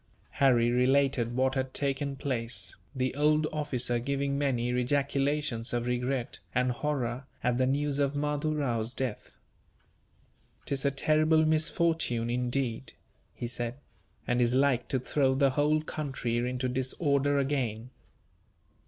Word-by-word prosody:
Harry 120 -4 +4
related 125 -1 +2
what 130 +1 +2
had 130 -1 -3
taken 140 0 -1
place, 115 -8 -2 0.2
the 130 -1 -1
old 150 +2 +2
officer 130 -5 0
giving 140 +2 -1
many 130 -4 0
ejaculations 135 -1 0
of 120 0 -1
regret, 125 +1 -2 0.2
and 125 0 +2
horror, 130 -2 -2 0.2
at 125 0 +1
the 130 - +3
news 145 +1 0
of 140 0 +1
Mahdoo 150 +1 -1
Rao's 120 -5 -1
death. 130 -5 -4 1.3
"'Tis 140 0 0
a - - +5
terrible 155 +3 +3
misfortune, 155 -6 +1
indeed," 125 0 -2 0.4
he - - -5
said, 120 0 -3 0.5
"and 120 0 +1
is 120 +1 +2
like 130 -3 +2
to 135 - +1
throw 130 +1 +1
the 135 0 +3
whole 150 +3 +2
country 135 -7 -3
into 125 0 -2
disorder 140 +2 +1
again." 125 -4 -1
130 Hz, 130 wpm, -29 LUFS, 120-145 Hz, 1.3 s, a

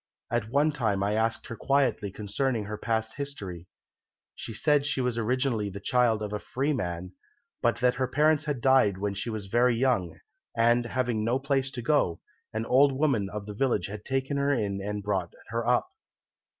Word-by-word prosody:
At 120 -3 -1
one 145 +5 +3
time 110 -9 0
I 100 +1 +1
asked 115 +1 0
her 115 - -6
quietly 130 -6 +1
concerning 110 +4 -1
her 105 +1 -4
past 110 +2 -2
history. 100 - -6 0.7
She - - -7
said 145 +5 +2
she 145 -1 -1
was 125 -2 0
originally 115 -2 0
the 100 +1 -7
child 115 0 +2
of 105 0 -4
a 105 - -2
free 140 +7 -1
man, 90 -6 -3 0.5
but 115 0 +1
that 125 -1 +4
her 130 - +2
parents 150 +3 +2
had 145 -5 -2
died 130 -7 +4
when 100 +1 -2
she 100 +4 -4
was 110 -3 -4
very 120 +4 +3
young, 115 -9 +1 0.4
and, 120 +1 +4
having 120 -3 -1
no 120 +3 +2
place 135 0 0
to 125 -3 -6
go 130 - +2
to, - - -26 0.4
an 110 - -1
old 135 +3 +5
woman 130 -8 +1
of 105 0 -6
the 105 - -6
village 130 +4 +1
had 105 +1 -7
taken 135 +1 -1
her 140 0 +2
in 100 -7 -1
and 105 +1 -4
brought 95 -4 -1 0.2
her 115 +1 -2
up. 125 0 +3
115 Hz, 195 wpm, -28 LUFS, 105-135 Hz, 0.7 s, old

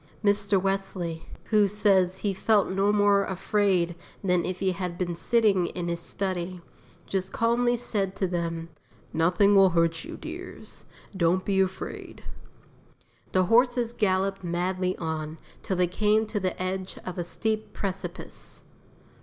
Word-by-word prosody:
Mr. 200 -1 +3
Wesley, 190 -4 -2 0.2
who 210 -2 +3
says 195 -3 +2
he 200 0 -1
felt 205 +1 +3
no 195 +2 +2
more 205 -1 +4
afraid 190 -2 +1 0.3
than 180 -2 +2
if 185 0 -3
he 190 -1 +1
had 180 -1 -4
been 175 -1 -1
sitting 200 -1 +2
in 175 -1 -4
his 170 0 -1
study, 185 0 -3 0.5
just 190 -1 -2
calmly 240 +1 +2
said 205 -5 -2
to 195 - 0
them: 170 -2 -3 0.4
"Nothing 180 +5 +4
will 195 -1 +7
hurt 165 -1 +1
you, - - -8
dears; - - -9 0.3
don't 185 +1 +2
be 195 -1 +1
afraid." 190 0 -4 1.1
The 185 - +3
horses 240 +3 +3
galloped 195 -2 0
madly 180 +1 -1
on, 160 -1 -4 0.2
till 190 - -2
they 180 - +4
came 210 +4 +2
to 215 -1 -2
the 185 -1 -2
edge 185 +1 -3
of 180 -1 -5
a - - 0
steep 215 +5 -2
precipice. 195 -1 -5
190 Hz, 145 wpm, -27 LUFS, 175-205 Hz, 1.1 s, will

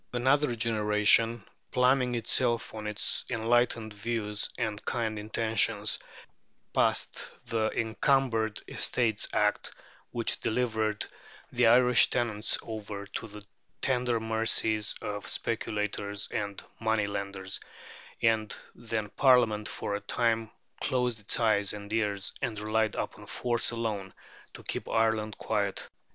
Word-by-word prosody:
Another 130 +1 +2
generation, 110 0 +4 0.3
pluming 125 -1 +3
itself 120 0 0
on 110 -1 -5
its 105 -1 0
enlightened 115 -1 +1
views 105 -1 -2
and 110 -3 -2
kind 110 -3 -2
intentions, 110 0 +1 0.7
passed - - +1 0.2
the 115 -2 0
Encumbered 115 -1 +1
Estates 110 -4 0
Act, 105 0 +1 0.4
which 115 -1 -1
delivered 110 -3 0 0.5
the 120 -1 +3
Irish 125 +1 +6
tenants 110 -3 0
over 105 -2 -6
to 105 +3 -6
the 105 -1 -11 0.3
tender 125 -3 +1
mercies 110 -1 +1
of 105 0 -4
speculators 105 -2 -1
and 100 -1 -3 0.2
money 110 -2 +1
lenders; 100 -1 -3 0.6
and 110 -2 +2 0.2
then 110 -2 -3
Parliament 115 -4 +3
for - - -4
a 100 - -2
time 115 +1 0 0.3
closed 125 -3 0
its 105 - -2
eyes 105 -4 +3
and 105 0 -7
ears, 105 -3 0
and 110 -3 -2
relied 110 +1 0
upon - - -5
force 120 -1 -1
alone 110 -5 -3 0.4
to - - -11
keep - - -4
Ireland 110 -2 +1
quiet. - - -1
110 Hz, 115 wpm, -29 LUFS, 105-120 Hz, 0.7 s, Irish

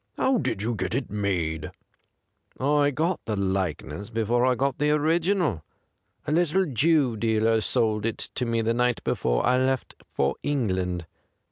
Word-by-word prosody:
How 260 -2 +2
did 100 - -2
you 120 +2 0
get 100 -1 -2
it 130 -2 -3
made 85 -7 -1 0.3
?' - - -49
' - - -32
I 145 +2 +3
got 160 +6 -1
the 110 - -2
likeness 95 -2 -2
before 115 +2 +1
I 130 - +3
got 135 +1 -1
the 150 0 +2
original. 160 - +1 0.6
A 150 - -2
little 175 +3 +2
Jew 145 - +2
dealer 110 0 +2
sold 110 0 0
it 115 - -3
me 115 -2 0
the 115 +1 +1
night 125 0 0
before - - 0
I 125 +1 +3
left 130 0 0 0.2
for 70 0 +1
England. 95 - -1
115 Hz, 160 wpm, -26 LUFS, 100-145 Hz, 0.6 s, I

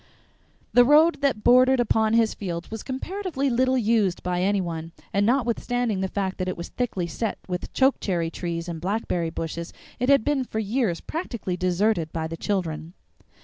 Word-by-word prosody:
The 245 - +8
road 300 +4 +5
that 265 -7 +1
bordered 255 +1 +6
upon 220 -2 +2
his 230 -1 +3
fields 175 -2 -5
was 220 -1 -5
comparatively 285 0 -3
little 260 +2 +2
used 215 -6 +1
by 180 0 -1
any 200 +2 +2
one, 165 -2 -4 0.2
and 200 +1 +2
notwithstanding 240 -3 0
the 190 - 0
fact 190 0 -3
that 185 - -1
it 185 - -3
was 170 - -6
thickly 220 -8 -2
set 205 +6 -3
with 180 -1 -4
chokecherry 185 -11 +1
trees 170 0 -4
and 165 -2 -5
blackberry 180 -3 -1
bushes 165 +1 -5 0.3
it 250 +2 0
had 275 -5 +5
been 290 -3 +1
for 230 - -6
years 220 -4 0
practically 235 - -4
deserted 180 -1 +1
by 160 -1 -3
the 160 +1 -4
children. 170 -2 -3
205 Hz, 175 wpm, -25 LUFS, 175-245 Hz, 0.3 s, The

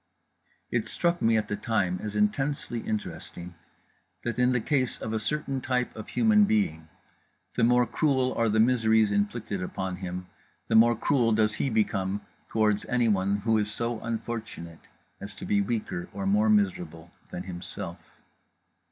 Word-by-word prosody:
It - - 0
struck 175 0 0
me 115 0 +4
at 110 - -1
the 105 - -2
time 100 -6 0
as 105 -1 -5
intensely 120 +4 0
interesting 90 -5 -5 0.7
that, 120 0 -3
in 125 0 +4
the 125 - +2
case 130 +1 0
of 110 - -4
a 110 - 0
certain 135 +2 -2
type 125 -1 -1
of 110 - -8
human 215 -2 +4
being, 80 - 0 0.6
the - - 0
more 125 +1 +5
cruel 130 +2 +1
are 115 -1 +1
the 110 +1 +2
miseries 110 -2 +4
inflicted 100 -1 -1
upon 95 0 -4
him 90 -1 -5 0.4
the - - 0
more 120 +1 +6
cruel 115 0 +2
does 105 -1 +2
he 135 - -1
become 105 -3 0 0.3
toward 105 -2 +2
anyone 100 -5 +2
who 110 -1 +3
is 105 0 -1
so 115 0 -2
unfortunate 110 -8 -6 0.3
as 100 0 -8
to - - -8
be 100 -1 +2
weaker 100 -5 -3
or 100 0 -4
more 105 +3 +3
miserable 90 -5 0 0.2
than 90 - -5
himself. 90 -1 -7
110 Hz, 160 wpm, -27 LUFS, 100-120 Hz, 0.7 s, more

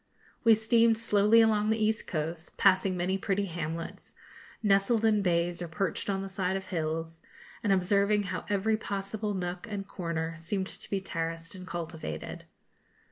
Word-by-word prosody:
We 225 -2 +7
steamed 225 +1 +4
slowly 215 0 +5
along 215 -1 +3
the 220 - +2
east 220 0 0
coast, 160 +1 -4
passing 190 -1 +4
many 185 +2 0
pretty 200 +1 0
hamlets, 165 -2 -5 0.5
nestled 210 +3 +3
in 215 -2 +4
bays 175 -1 +1
or 175 - -3
perched 175 +4 -2
on 195 -1 0
the - - -4
side 190 0 -1
of 190 - -6
the - - -15
hills, 160 0 -2 0.4
and 205 - +1
observing 200 +2 +3
how 185 -1 -4
every 205 +2 +2
possible 205 0 -3
nook 180 +2 -4
and 200 -2 -4
corner 165 -3 -3
seemed 190 +4 -2
to - - -7
be 195 -1 -1
terraced 165 -2 -4
and 185 -1 -9
cultivated. 160 - -5
195 Hz, 165 wpm, -29 LUFS, 170-210 Hz, 0.5 s, We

